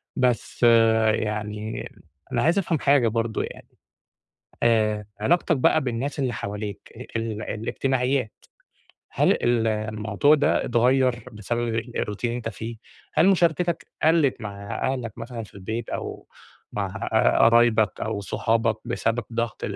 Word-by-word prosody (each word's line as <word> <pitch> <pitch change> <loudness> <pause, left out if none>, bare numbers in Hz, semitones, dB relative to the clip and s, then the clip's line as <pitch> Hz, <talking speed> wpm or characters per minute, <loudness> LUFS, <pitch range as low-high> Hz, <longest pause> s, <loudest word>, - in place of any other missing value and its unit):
بس 125 -2 0 0.5
يعني 105 0 -3 0.4
أنا 120 - +1
عايز 165 +5 +3
أفهم 165 -4 0
حاجة 140 -2 +4
برضه 115 0 -1
يعني - - -9 1.0
آآ 110 -2 +2 0.2
علاقتك 165 +5 +2
بقى 130 - +3
بالناس 130 +3 -3
اللي 130 -3 0
حواليك 105 -1 -6 0.2
ال 110 -1 -3
الاجتماعيات 125 +2 -1 0.8
هل - - +2
ال 120 -1 +1
الموضوع 110 +4 +2
ده 145 - +2
اتغير 125 +2 +3 0.2
بسبب 115 +2 -2
الroutine 110 -2 -5
اللي 120 0 0
أنت 120 - -4
فيه، 115 +1 -6 0.4
هل 160 +5 +5
مشاركتك 175 -2 +2 0.2
قلِت 160 -4 +3
مع 100 -1 -6
أهلك 120 -4 -5
مثلًا 115 0 -6
في - - -18
البيت 110 +4 -5
أو - - -5 0.5
مع - - -2 0.5
قرايبك 115 -2 +4
أو 110 -2 -2
صحابك 115 +2 0
بسبب 115 0 -1
ضغط 115 -1 -3
115 Hz, 125 wpm, -24 LUFS, 110-130 Hz, 1.0 s, هل